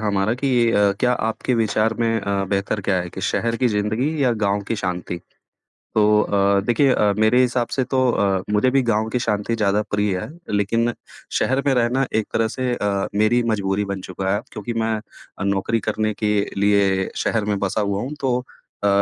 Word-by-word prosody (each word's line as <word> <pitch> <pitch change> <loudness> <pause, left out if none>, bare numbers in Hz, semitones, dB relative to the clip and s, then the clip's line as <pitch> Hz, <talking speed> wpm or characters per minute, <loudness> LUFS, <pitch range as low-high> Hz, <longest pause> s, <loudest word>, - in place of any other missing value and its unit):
हमारा 105 +1 +1
कि 135 +2 -1 0.2
अ, 100 -2 +3
क्या 125 -1 +3
आपके 115 +2 -1
विचार 110 0 +1
में 115 -1 +1
अ, 100 -1 -1
बेहतर 100 +1 -1
क्या 95 -1 0
है 90 0 -6
कि - - -7
शहर 115 0 0
की 130 - +1
ज़िंदगी 110 +5 0
या 125 - +3
गाँव 100 +1 +1
की 115 - -1
शांति? 90 -2 -3 0.8
तो 105 0 +4
अ, 100 0 +2
देखिए 130 +3 +3
अ, 105 -1 +3
मेरे 110 +3 +4
हिसाब 125 -1 +1
से 130 - +1
तो 130 +1 0
अ, 100 -4 +1
मुझे 105 +5 +3
भी 135 +1 +3
गाँव 110 0 +1
की 125 - 0
शांति 105 +2 0
ज़्यादा 105 -1 +1
प्रिय 105 -2 0
है। - - -6 0.2
लेकिन 115 +4 +1 0.5
शहर 135 +1 +1
में 140 - +4
रहना 125 +2 +1
एक 110 -1 +1
तरह 115 0 +1
से 130 -1 -1
अ, 100 -3 -1
मेरी 110 +4 +3
मजबूरी 100 -1 0
बन 95 - -4
चुका 95 +1 -1
है, 105 - 0
क्योंकि 105 +1 -5
मैं 110 0 0 0.4
अ, - - -3
नौकरी 100 +3 0
करने 110 0 0
के 105 0 +2 0.2
लिए 100 -2 +2
शहर 110 -2 0
में 105 -1 -1
बसा 100 +2 -1
हुआ 100 -1 -1
हूँ 135 +4 -4
तो 130 -2 +1 0.5
अ, - - +4
105 Hz, 200 wpm, -21 LUFS, 100-120 Hz, 0.8 s, तो